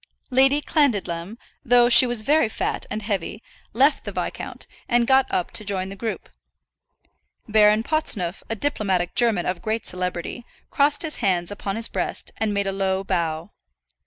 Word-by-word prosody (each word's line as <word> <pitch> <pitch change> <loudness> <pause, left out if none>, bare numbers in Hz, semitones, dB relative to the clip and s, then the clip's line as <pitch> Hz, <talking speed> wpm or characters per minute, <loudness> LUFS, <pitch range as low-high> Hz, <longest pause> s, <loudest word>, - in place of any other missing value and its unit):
Lady 270 +3 +4
Clandidlem, 205 - 0 0.3
though 245 0 +5
she 245 +1 +7
was 240 -3 -1
very 295 -2 +3
fat - - -3
and 215 0 -4
heavy, 205 +1 -3 0.3
left 270 +7 +3
the - - -5
viscount, - - -5 0.2
and 240 0 +3
got 265 +1 +4
up 180 - -1
to - - -5
join 190 -2 -2
the 195 - -8
group. 220 +2 -5 1.2
Baron 215 0 +4
Potsneuf, 210 - -1
a 225 - -1
diplomatic 195 -8 0
German 225 -7 +2
of 180 -1 -2
great 220 +3 -2
celebrity, 180 +5 -4 0.3
crossed 290 +2 +2
his 315 -2 -1
hands 185 -4 0
upon 200 -1 -4
his 225 0 +1
breast - - -3
and 220 -1 0
made 200 -1 -1
a 195 - -1
low 190 0 -1
bow. 170 -2 -2
215 Hz, 160 wpm, -23 LUFS, 190-245 Hz, 1.2 s, she